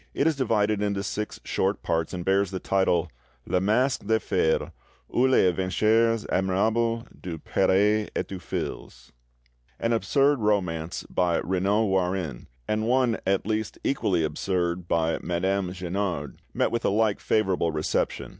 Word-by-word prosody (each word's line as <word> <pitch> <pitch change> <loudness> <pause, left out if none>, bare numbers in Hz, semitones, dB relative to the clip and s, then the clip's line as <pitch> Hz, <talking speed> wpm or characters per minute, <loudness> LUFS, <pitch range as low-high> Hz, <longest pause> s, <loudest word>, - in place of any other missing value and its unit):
It 140 - +1
is 160 -1 +3
divided 110 -5 +1
into 100 -1 -1
six 105 0 -4
short 95 +2 -1
parts, 80 -1 -1
and 90 -2 -5
bears 95 0 +2
the 95 - -4
title, 90 -3 +1 0.3
'Le 90 - 0
Masque 120 +7 +1
de 110 0 +3
Fer, 80 -5 0 0.4
ou 130 +2 +4
les 130 -7 +4
Aventures 110 +5 +2
admirables 110 +5 +1 0.2
du 85 -3 -5
Prre 105 +6 +2
et - - -1
du 95 - -6
Fils'. 60 -7 -6 0.7
An 115 0 +1
absurd 140 +4 +2
romance 90 -6 -1
by 90 -2 +1
Regnault 100 +4 +1
Warin, 90 -8 -1 0.2
and 110 +1 0
one 125 -2 +2
at 95 0 +1
least 110 0 -2
equally 95 -11 +1
absurd 85 +2 -1
by 80 -1 +1
Madame 95 +1 -1
Guenard, 90 -4 -3
met - - 0
with 115 - -1
a - - +2
like 105 0 +1
favourable 95 -6 +1
reception. 75 0 -1
95 Hz, 145 wpm, -26 LUFS, 90-110 Hz, 0.7 s, ou